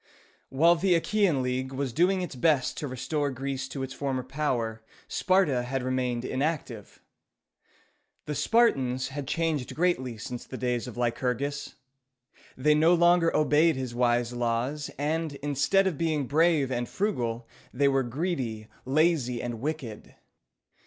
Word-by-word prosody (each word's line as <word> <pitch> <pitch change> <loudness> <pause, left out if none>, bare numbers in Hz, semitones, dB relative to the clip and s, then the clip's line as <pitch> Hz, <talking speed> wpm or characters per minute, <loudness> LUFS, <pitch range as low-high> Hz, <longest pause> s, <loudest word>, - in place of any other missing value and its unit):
While 165 +6 +4
the 180 +1 +3
Achæan 180 -8 +1
League 130 +1 -2
was 135 -2 -3
doing 185 +4 +2
its 175 - -5
best 135 -1 +2
to 150 - -3
restore 140 +3 -2
Greece 135 0 -4
to 135 0 -5
its 130 0 -5
former 135 -3 -2
power, 125 -5 -2 0.3
Sparta 185 -9 +2
had 125 +1 -3
remained 125 -2 -1
inactive. 135 -7 -3 1.2
The 150 - -3
Spartans 135 - +2
had 140 0 -6
changed 155 -4 -1
greatly 140 -9 0
since 120 +2 -6
the 130 - -8
days 125 -1 -1
of 125 - -9
Lycurgus. 125 +4 -2 0.8
They 150 +4 +4
no 160 +3 +5
longer 175 0 +4
obeyed 155 +2 +4
his 130 -2 -4
wise 120 0 +1
laws, 120 +5 -1
and, 155 +2 -1
instead 145 +7 +2
of 180 -7 -1
being 155 -4 0
brave 150 -1 +2
and 120 -1 -2
frugal, 120 - -2 0.2
they 140 +3 +2
were 135 -1 +3
greedy, 125 -5 -3 0.2
lazy, 135 -3 +2
and 120 -2 -4
wicked. 140 -7 -5
135 Hz, 140 wpm, -27 LUFS, 125-160 Hz, 1.2 s, no